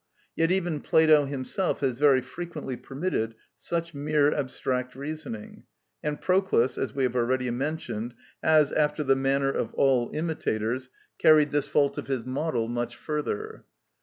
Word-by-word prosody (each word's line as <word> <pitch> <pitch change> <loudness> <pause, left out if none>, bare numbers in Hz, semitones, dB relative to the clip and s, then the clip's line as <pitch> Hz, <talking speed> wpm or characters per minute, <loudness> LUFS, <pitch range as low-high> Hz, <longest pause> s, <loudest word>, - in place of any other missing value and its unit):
Yet 165 0 +2
even 175 -5 0
Plato 155 -2 +5
himself 140 +8 -2
has 130 -3 0
very 140 -3 +5
frequently 160 -4 -6
permitted 130 -3 -3 0.2
such 170 0 -3
mere 145 0 +2
abstract 130 -2 -2
reasoning; 140 -6 -7 0.4
and 150 -1 -2
Proclus, 185 -10 +2
as - - -3
we 135 - 0
have 125 -1 0
already 125 +1 +1
mentioned, 120 -4 -3 0.3
has, 155 -2 +4
after 150 0 +1
the 135 -1 +3
manner 135 +1 +1
of - - -3
all 130 -3 +3
imitators, 130 -6 -2 0.3
carried 155 -2 +6
this 145 -1 0
fault 140 -1 +2
of - - -7
his 130 -4 -2
model 130 -3 -1
much 120 0 -3
further. 150 -8 -4
140 Hz, 145 wpm, -27 LUFS, 125-155 Hz, 0.4 s, carried